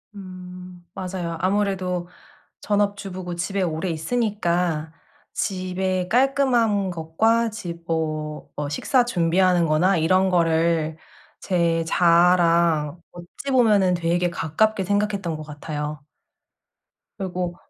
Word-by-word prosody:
음 180 -2 -10
맞아요. 180 -3 -4
아무래도 185 -2 0 0.5
전업주부고 200 -3 -2
집에 190 +3 -2
오래 165 +1 -2
있으니까 170 -4 -1 0.4
집에 185 -1 -2
깔끔한 240 -6 +2
것과 220 +8 +1
집 170 -6 -8
어 155 -2 -3
어 145 -1 -3
식사 245 - +2
준비하는 180 -3 +2
거나 170 +5 +3
이런 185 +4 +3
거를 165 -2 +1 0.4
제 170 -3 +1
자아랑 170 -2 +3
어찌보면 205 +1 +1
되게 175 +1 0
가깝게 190 +6 0
생각했던 205 -3 -1
것 155 - -7
같아요. 150 -1 -6 1.1
그리고 180 -2 -3
180 Hz, 225 characters per minute, -23 LUFS, 165-195 Hz, 1.1 s, 거나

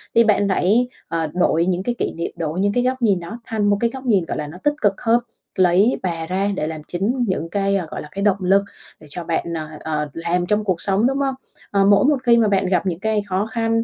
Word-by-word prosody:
thì 230 - +7
bạn 210 -2 +3
hãy, 210 +6 +2 0.2
ờ, 165 -1 -1
đổi 170 -2 +2
những 185 0 0
cái 240 +3 -1
kỷ - - -1
niệm, 170 - -4
đổi 160 +1 -3
những 200 +1 +1
cái 245 - +1
góc 255 +1 -1
nhìn 205 -6 +3
đó 175 +7 -8
thành 220 -4 -1
một 205 - +3
cái 235 - +2
góc 265 +2 -9
nhìn, 200 -8 +2
gọi - - -4
là, 150 - -4
nó 155 +4 -10
tích 295 - +3
cực 200 -2 +1
hơn. 235 0 +3 0.4
Lấy 185 +5 +3
bà 165 -3 -2
ra 190 +4 -1
để 155 - -2
làm 160 -1 -5
chính 230 +8 -1
những 165 -4 -2
cái, 200 +1 0
à, 190 -3 -1
gọi - - -5
là, - - -9
cái 200 - -5
động 200 -2 +3
lực 195 +2 +3 0.4
để 155 - -15
cho 175 +4 -5
bạn, 170 +1 -2
ờ, 155 -1 -4
ờ, 150 -1 -3
làm 170 +2 -1
trong 210 +3 +1
cuộc 185 -5 -1
sống, 200 +4 +2
đúng 270 +1 -1
không? 270 -1 0 0.4
Ờ, 200 -1 +3
mỗi 200 +2 +5
một 290 0 +4
khi 235 -1 +5
mà 225 -2 +4
bạn 195 -2 +2
gặp 180 -1 +1
những 175 -3 -2
cái 220 +1 0
khó 190 +1 0
khăn 225 0 0
195 Hz, 270 wpm, -21 LUFS, 175-225 Hz, 0.4 s, thì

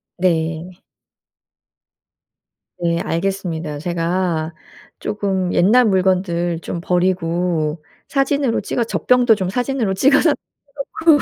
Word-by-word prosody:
네. 170 0 -1 2.0
네. 170 -1 0
알겠습니다. 170 -4 -2
제가 170 -1 -1 0.5
쪼금 190 -3 -1
옛날 235 +7 +5
물건들 180 -3 +1
좀 170 - -5
버리고 175 -3 0 0.2
사진으로 275 -3 +1
찍어 240 - -1
젖병도 245 +1 +3
좀 190 -4 -2
사진으로 245 -3 -1
찍어서 280 - +4
해 290 - +2 0.8
놓고 290 - +5
185 Hz, 215 characters per minute, -19 LUFS, 170-215 Hz, 2.0 s, 옛날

